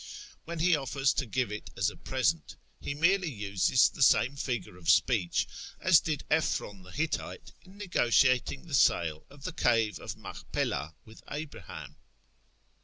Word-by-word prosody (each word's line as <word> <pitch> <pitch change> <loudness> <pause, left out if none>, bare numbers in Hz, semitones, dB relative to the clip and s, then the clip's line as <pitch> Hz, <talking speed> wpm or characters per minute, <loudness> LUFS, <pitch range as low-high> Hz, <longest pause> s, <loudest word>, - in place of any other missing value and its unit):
When 170 +1 -6
he 170 +2 +4
offers 135 -1 0
to 140 - -2
give 125 -1 -1
it 105 - -6
as - - +1
a - - -14
present, 80 -2 -1 0.2
he 140 - -4
merely 180 +3 +2
uses 105 0 +2
the - - -8
same 130 0 +4
figure 125 -9 -4
of 90 -2 -5
speech 100 -9 +3 0.3
as 185 -3 +6
did 150 -3 -3
Ephron 105 -10 0
the 90 - -15
Hittite 150 - -3
in 190 +2 -17
negotiating 130 - +2
the 165 - -10
sale 80 - +2
of 140 -1 -16
the 180 - -4
cave 115 -8 +1
of - - -7
Machpelah 75 +3 -4
with 110 +1 -15
Abraham. 145 - -8
130 Hz, 155 wpm, -29 LUFS, 105-155 Hz, 0.3 s, as